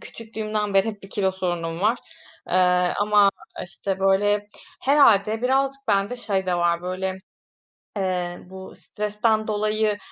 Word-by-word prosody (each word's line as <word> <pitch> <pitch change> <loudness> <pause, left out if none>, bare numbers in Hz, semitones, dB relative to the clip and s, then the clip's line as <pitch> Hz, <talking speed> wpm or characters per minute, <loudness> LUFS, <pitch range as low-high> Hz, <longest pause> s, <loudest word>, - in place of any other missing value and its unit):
küçüklüğümden 215 -2 -4
beri 195 +3 +4
hep 210 -2 -7
bir 195 - -12
kilo 190 -2 0
sorunum 175 -2 -3
var. 220 +4 +2 0.5
Eee, - - -2 0.4
ama, 205 -1 +4 0.3
işte, 190 +1 -5
böyle 205 +2 +2 0.3
herhâlde 225 -6 +4
birazcık 270 +1 0
bende 200 +4 +1
şey 200 -5 -2
de 180 - +1
var 175 0 +1
böyle, 185 +1 -3 0.8
eee, 180 -2 -2
bu 190 +1 -11
stresten 215 +1 -1
dolayı, 215 0 0
205 Hz, 130 wpm, -23 LUFS, 190-215 Hz, 0.8 s, beri